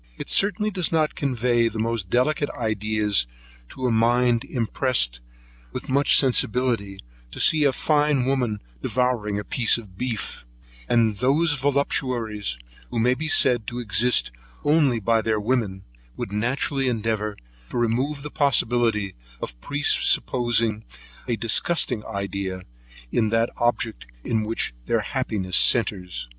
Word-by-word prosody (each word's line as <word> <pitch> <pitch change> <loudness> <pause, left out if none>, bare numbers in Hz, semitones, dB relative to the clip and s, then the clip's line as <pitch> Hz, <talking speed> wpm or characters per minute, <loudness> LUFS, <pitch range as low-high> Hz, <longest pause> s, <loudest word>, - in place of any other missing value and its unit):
It - - -5
certainly 210 +2 +1
does 180 -4 0
not 155 -2 +1
convey 120 -3 0
the 115 -1 -5
most 110 -4 -2
delicate 145 +6 +1
ideas, 105 - +1 0.4
to 130 - -6
a 125 - +2
mind 120 +1 +2
impressed 115 - 0 0.5
with - - -7
much 140 +2 +4
sensibility, 120 -6 +2 0.3
to - - -10
see 155 -2 +4
a 140 - +4
fine 145 -1 +1
woman 125 -6 -1 0.2
devouring 120 - -1
a 105 - -3
piece 115 +1 +3
of 100 -5 -13
beef; 120 - -4 0.5
and 115 -3 +2
those 145 +6 +2
voluptuaries, 125 - -1 0.3
who 120 - -5
may 120 +2 +3
be 155 +5 -4
said 125 -7 +3
to 120 - -5
exist 120 - +2 0.3
only 145 -5 +3
by 115 +2 +1
their 110 -1 0
women, 105 -4 -1 0.3
would - - -5
naturally 130 +5 -1
endeavour 110 -3 -2 0.3
to - - -5
remove 130 +5 -1
the 150 - -6
possibility 120 -8 +1 0.3
of - - -8
presupposing 120 - +2 0.4
a 120 - 0
disgusting 115 +1 +1
idea 100 -2 -4 0.5
in 110 -2 +1
that 115 +1 +1
object 115 - -1 0.2
in 110 -2 -1
which 115 - -1
all - - -28
their - - +1
happiness 95 -4 -1
centres. 90 - +2
115 Hz, 135 wpm, -23 LUFS, 105-130 Hz, 0.5 s, much